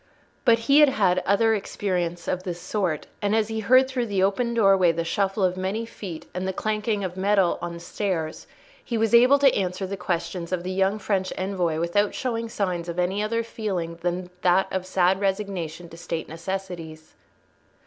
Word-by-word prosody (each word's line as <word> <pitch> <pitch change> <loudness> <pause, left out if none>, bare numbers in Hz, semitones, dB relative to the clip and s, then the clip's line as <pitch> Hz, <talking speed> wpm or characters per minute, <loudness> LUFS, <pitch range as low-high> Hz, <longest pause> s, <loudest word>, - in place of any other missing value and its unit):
But 230 -3 +6
he 280 +4 +6
had 300 -2 +7
had 195 -8 +2
other 225 +3 +4
experience 180 -4 -2
of 185 - -1
this 180 -2 -5
sort, 175 -5 -2 0.2
and 205 +1 +1
as 220 -1 +1
he 220 0 -2
heard 255 +5 +5
through 255 -3 -2
the 195 -3 +1
open 235 +5 +1
doorway 195 -5 +5
the 165 0 -2
shuffle 195 +3 0
of 180 -1 +2
many 190 +5 -2
feet 190 -7 -8
and 185 +1 -3
the 190 - -1
clanking 215 +1 -1
of 180 -1 -4
metal 195 -1 +2
on 175 0 -4
the - - -8
stairs, 170 -3 -3 0.4
he 235 - -2
was 225 +1 +1
able 250 +4 +7
to 275 -2 +4
answer 185 0 -1
the 195 +1 -4
questions 175 -1 -3
of 180 -2 -1
the 185 - -3
young 190 +2 +1
French 190 -2 -1
envoy 180 -4 -1
without 200 +5 +1
showing 230 -3 -2
signs 180 -5 -2
of 170 - -5
any 185 +3 0
other 230 +2 0
feeling 185 -7 -4
than 180 +1 -2
that 185 +1 +4
of 185 -1 -2
sad 185 0 +2
resignation 190 -4 -2
to 165 - -12
State 165 -1 -4
necessities. 165 -2 -6
190 Hz, 190 wpm, -25 LUFS, 175-215 Hz, 0.4 s, had